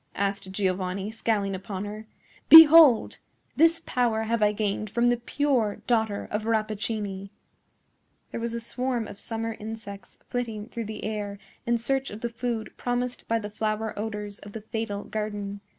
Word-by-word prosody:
asked 200 -1 -2
Giovanni, 190 +1 -2
scowling 215 -3 -1
upon 190 +1 -5
her. 215 +1 -8 0.4
"Behold! 320 -5 +9 0.4
this 330 +2 +5
power 235 -3 0
have 225 0 -1
I 210 0 +4
gained 210 0 -2
from 235 +3 +2
the 245 - +2
pure 240 -3 0
daughter 220 -4 0
of 215 +1 -2
Rappaccini." 215 -3 -2 1.0
There - - -4
was 230 0 -3
a - - -2
swarm 245 0 -2
of 200 - -10
summer 225 0 -4
insects 215 -2 -9
flitting 225 -3 -4
through 230 -2 -5
the 215 0 -7
air 205 -2 -4 0.3
in 235 0 +3
search 270 +3 -1
of 210 +2 -9
the 235 - -2
food 230 -1 -4
promised 245 0 -3
by 230 - +1
the 210 -2 -6
flower 215 +1 -2
odors 210 -1 -5
of 205 - -12
the 220 - -6
fatal 210 -1 -4
garden. 205 -2 -4
220 Hz, 160 wpm, -26 LUFS, 205-235 Hz, 1.0 s, Behold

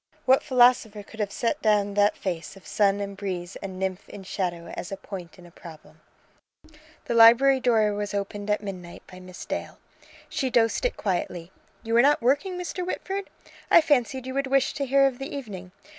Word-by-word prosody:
What 260 +1 +5
philosopher 245 -5 +3
could 220 +2 -15
have 205 -2 -1
set 255 +8 -2
down 205 -2 +2
that 205 0 +2
face 180 0 -5
of 190 - -17
sun 200 -1 +1
and 200 0 -5
breeze 185 -2 -5
and 190 -2 -7
nymph 190 0 -4
in 200 - -10
shadow 175 -3 -4
as 175 - -6
a 195 - -4
point 180 -5 -9
in 180 - -15
a 175 - -15
problem? 165 -2 -14 1.0
The - - -2
library 240 +4 +7
door 225 -4 +2
was 205 0 -3
opened 205 +1 -4
at 210 0 0
midnight 180 -4 -8
by 185 - -13
Miss 185 -1 -10
Dale. - - -5 0.5
She 265 - -2
dosed 230 - +1
it - - -1
quietly. 175 -2 -3 0.3
"You 225 0 -1
are - - +7
not 290 +3 +4
working, 285 +10 0
Mr. 360 0 -4
Whitford? 385 +2 -4 0.4
I - - +8
fancied 265 -4 +1
you 260 - -5
would 275 0 -1
wish 270 0 +2
to 280 -2 -3
hear 275 +1 +4
of 265 -2 -1
the 270 +1 -6
evening. 195 -9 -8
210 Hz, 195 wpm, -25 LUFS, 190-260 Hz, 1.0 s, I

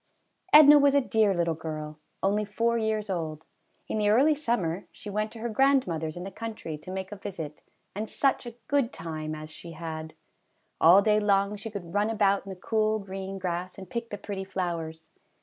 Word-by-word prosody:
Edna 295 -1 +9
was 285 0 +4
a - - +7
dear 220 -6 +2
little 170 -3 +1
girl, 155 -1 -6 0.2
only 205 +2 +2
four 230 +3 0
years 220 -2 0
old. 160 -5 -4 0.4
In 215 - -2
the 205 -1 +2
early 270 +9 +5
summer 230 - -1
she 205 - -9
went 215 +1 -1
to 230 - -10
her 235 - -2
grandmother's 210 - +1
in 175 - -5
the 195 - -6
country 215 -7 -6
to 185 - -12
make 190 +1 -5
a - - -5
visit, 170 -7 -7 0.3
and 215 +2 -4
such 270 -3 +1
a 235 - -8
good 280 -4 +1
time 155 -1 -5
as 155 0 -9
she 165 +2 -10
had! 160 -1 -6 0.6
All 180 +5 +7
day 210 0 +4
long 200 0 +2
she 215 +2 -7
could 185 -5 -7
run 205 +1 +2
about 200 -3 +2
in - - -6
the 190 - -5
cool 215 +3 0
green 195 -1 -6
grass 180 -1 -3
and 190 -2 -10
pick 235 -1 -4
the 205 - -5
pretty 200 -1 -5
flowers. 170 -4 -4
195 Hz, 200 wpm, -28 LUFS, 170-220 Hz, 0.6 s, Edna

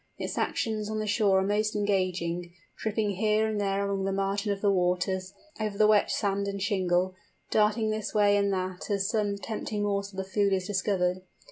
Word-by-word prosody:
Its - - -4
actions 215 -2 -1
on 215 - -2
the 215 - -1
shore 205 -2 +3
are 190 - +2
most 210 +2 0
engaging, 185 -4 -1 0.2
tripping 215 -1 -1
here 215 +1 +2
and 215 -1 -1
there 200 0 0
along 200 -1 -1
the 195 - 0
margin 195 +2 -1
of 200 - -2
the 200 0 +3
waves, 185 +1 0 0.2
over 210 -2 -2
the 215 - +5
wet 210 -1 +4
sand 200 -1 0
and 200 0 -3
shingle, 185 -2 +1 0.4
darting 215 +1 +2
this 215 -1 -3
way 205 -1 +4
and 200 0 +2
that 185 0 -3
as 200 -1 +1
some 205 -2 0
tempting 210 0 -4
morsel 200 -1 -2
of 190 - -4
food 200 0 +1
is 185 -1 0
discovered. 185 -2 0
200 Hz, 195 wpm, -28 LUFS, 190-210 Hz, 0.4 s, the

